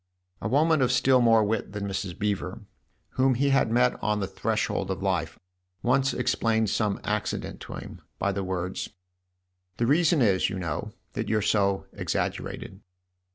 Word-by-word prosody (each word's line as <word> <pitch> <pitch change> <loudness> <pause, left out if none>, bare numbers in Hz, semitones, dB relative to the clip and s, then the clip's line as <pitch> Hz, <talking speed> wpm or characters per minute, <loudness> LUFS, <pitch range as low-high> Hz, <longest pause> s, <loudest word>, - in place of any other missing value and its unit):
A - - -2
woman 155 +4 +3
of 125 -1 +3
still 130 +1 +4
more 115 -2 +5
wit 105 -1 -2
than 100 -1 -3
Mrs. 95 -2 -4
Beever, 100 0 -2 0.5
whom 130 0 +2
he 140 +3 +2
had 135 -4 +3
met 125 +2 +2
on 105 0 +1
the 100 - -1
threshold 95 0 -1
of 95 0 -3
life, 85 -4 -1 0.5
once 135 +2 +3
explained 110 -3 +1
some 105 -3 0
accident - - -2
to - - -8
him - - -9 0.2
by 100 - 0
the 100 0 -2
words: 95 0 -3 0.4
" 90 0 -48
The 120 - +1
reason 155 +1 +4
is, 95 -4 +3
you 95 - -4
know, 85 -5 -4 0.2
that - - -3
you're 110 -1 +1
so 100 -2 +2
exaggerated." 95 +1 -3
105 Hz, 165 wpm, -27 LUFS, 95-125 Hz, 0.5 s, more